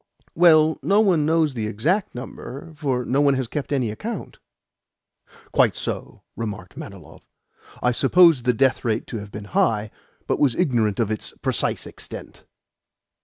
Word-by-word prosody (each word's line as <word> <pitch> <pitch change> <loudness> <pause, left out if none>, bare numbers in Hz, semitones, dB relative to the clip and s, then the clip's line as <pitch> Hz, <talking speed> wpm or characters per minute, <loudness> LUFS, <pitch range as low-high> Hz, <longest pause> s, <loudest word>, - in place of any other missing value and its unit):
"Well, 160 -2 +5
no 200 +2 +3
one 175 -8 +3
knows 160 -3 +2
the 110 -4 -3
exact 155 - -1
number, 135 +5 -8
for 135 -5 -2
no 135 +3 +1
one 140 -1 +4
has 130 -2 -2
kept 145 +4 -5
any 130 -6 0
account." 215 - -6 1.1
"Quite - - +3
so," - - -5
remarked 105 -5 -6
Manilov. 90 -6 -11 0.6
"I 125 - +3
supposed 145 +1 +5
the 125 - +4
death 130 +2 +2
rate 115 -2 -1
to 115 - -6
have 100 0 -10
been 105 0 -7
high, 110 -2 +1 0.3
but - - -1
was 135 -5 +3
ignorant 120 - +1
of 110 -2 +1
its 110 - -4
precise - - 0
extent." - - -10
130 Hz, 155 wpm, -23 LUFS, 110-155 Hz, 1.1 s, Well